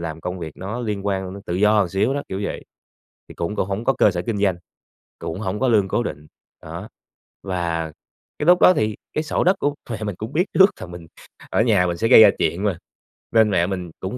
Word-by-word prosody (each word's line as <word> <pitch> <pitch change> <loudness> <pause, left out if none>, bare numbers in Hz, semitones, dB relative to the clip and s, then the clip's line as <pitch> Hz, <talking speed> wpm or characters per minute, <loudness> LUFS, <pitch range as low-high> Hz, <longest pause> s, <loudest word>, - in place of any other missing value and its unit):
làm 80 -1 -5
công 90 +2 -4
việc 80 -3 -7
nó 110 +6 -5
liên 105 -3 -3
quan 95 -1 -2
đến 100 - -10
tự 85 - -2
do 105 0 +3
xíu 105 +9 0
đó, 145 - -2
kiểu 95 +1 -4
vậy, - - -5 0.6
thì - - -11
cũng 95 +5 -3
cũng - - 0
hổng 100 +4 -3
có 135 - +3
cơ 105 - +5
sở 90 -1 -3
kinh 110 -3 -1
doanh, 95 -3 +1 0.6
cũng 85 +4 -5
hổng 105 0 -3
có 130 - +2
lương 105 -4 +3
cố 120 - 0
định, 75 -8 -6 0.4
đó. - - -8 0.6
Và 85 -4 -2 0.5
cái 150 - -1
lúc 180 0 +6
đó 185 - +8
thì 110 - 0 0.2
cái 155 - -1
sổ 150 - 0
đất 185 +3 +4
của 145 0 0
mẹ 110 -2 -4
mình 105 -3 -3
cũng 110 +8 -7
biết 175 +4 +2
trước 190 +1 +7
là - - -6
mình 85 -2 -10 0.4
ở - - +2
nhà 105 -6 +3
mình 85 -1 -2
sẽ 115 - +1
gây 110 - +9
ra - - +8
chuyện 90 +4 0
mà. 100 -5 0 0.5
Nên 110 -2 +4
mẹ 90 -2 +2
mình 90 -4 -4
cũng 95 +7 -5
100 Hz, 240 wpm, -22 LUFS, 90-110 Hz, 0.6 s, gây